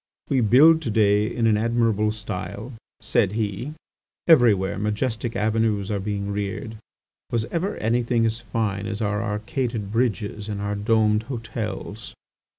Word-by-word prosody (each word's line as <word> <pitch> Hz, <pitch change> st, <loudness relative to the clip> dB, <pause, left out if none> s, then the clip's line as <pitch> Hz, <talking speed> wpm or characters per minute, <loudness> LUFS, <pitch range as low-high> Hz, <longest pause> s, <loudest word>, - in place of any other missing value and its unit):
"We 135 Hz, -2 st, +2 dB
build 145 Hz, +9 st, +6 dB
to 125 Hz, -, -3 dB
day 105 Hz, -1 st, +3 dB
in 115 Hz, -, -1 dB
an 110 Hz, -2 st, +4 dB
admirable 115 Hz, -2 st, +1 dB
style," 105 Hz, +2 st, -6 dB, 0.3 s
said 95 Hz, -, +1 dB
he; 110 Hz, +6 st, -3 dB, 0.5 s
"everywhere 110 Hz, -, +4 dB
majestic 110 Hz, +2 st, -2 dB
avenues 110 Hz, -2 st, 0 dB
are 100 Hz, -, 0 dB
being 100 Hz, 0 st, -3 dB
reared. 105 Hz, +2 st, -4 dB, 0.5 s
Was 115 Hz, -2 st, 0 dB
ever 185 Hz, +5 st, -1 dB
anything 115 Hz, +1 st, +1 dB
as 115 Hz, +1 st, -1 dB
fine 105 Hz, -2 st, -2 dB
as 110 Hz, -1 st, -4 dB
our 105 Hz, -2 st, 0 dB
arcaded 110 Hz, 0 st, -3 dB
bridges 110 Hz, -3 st, -1 dB
and 105 Hz, -1 st, -3 dB
our 100 Hz, 0 st, -2 dB
domed 105 Hz, 0 st, +2 dB
hotels!" 115 Hz, -3 st, -5 dB
110 Hz, 140 wpm, -24 LUFS, 105-115 Hz, 0.5 s, build